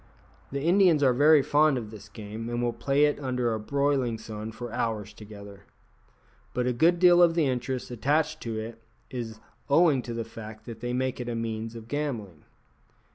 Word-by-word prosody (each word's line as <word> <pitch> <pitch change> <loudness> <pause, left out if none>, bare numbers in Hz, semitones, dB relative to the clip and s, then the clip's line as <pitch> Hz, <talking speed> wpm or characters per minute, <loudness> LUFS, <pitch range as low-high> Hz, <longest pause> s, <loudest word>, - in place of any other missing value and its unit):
The 140 0 -3
Indians 175 -3 +4
are 130 -2 +5
very 145 +2 +6
fond 150 -1 +3
of 110 -3 -6
this 110 -2 -11
game, 110 +2 -7
and 120 0 -2
will 120 -1 0
play 140 +5 +2
at 145 - 0
it - - -9
under 125 -3 0
a 110 - -2
broiling 135 0 0
sun 110 0 -7
for 120 +1 -7
hours 105 -3 -2
together. 100 -2 -12 0.9
But 125 0 0
a 125 - +1
good 165 +8 +4
deal 175 0 +6
of 170 -1 +5
the 165 -3 +3
interest 125 -1 -2
attaching 155 +6 0
to 115 -2 -4
it 115 +1 -7 0.3
is 115 -4 -5 0.3
owing 145 -2 +4
to 120 -1 -6
the 115 -1 -3
fact 110 -1 -10
that 115 -2 -8
they 120 +1 -3
make 130 +1 -1
it 120 -1 -4
a 120 - -2
means 115 0 -4
of 115 -1 -9
gambling. 115 - -4
120 Hz, 195 wpm, -27 LUFS, 110-145 Hz, 0.9 s, very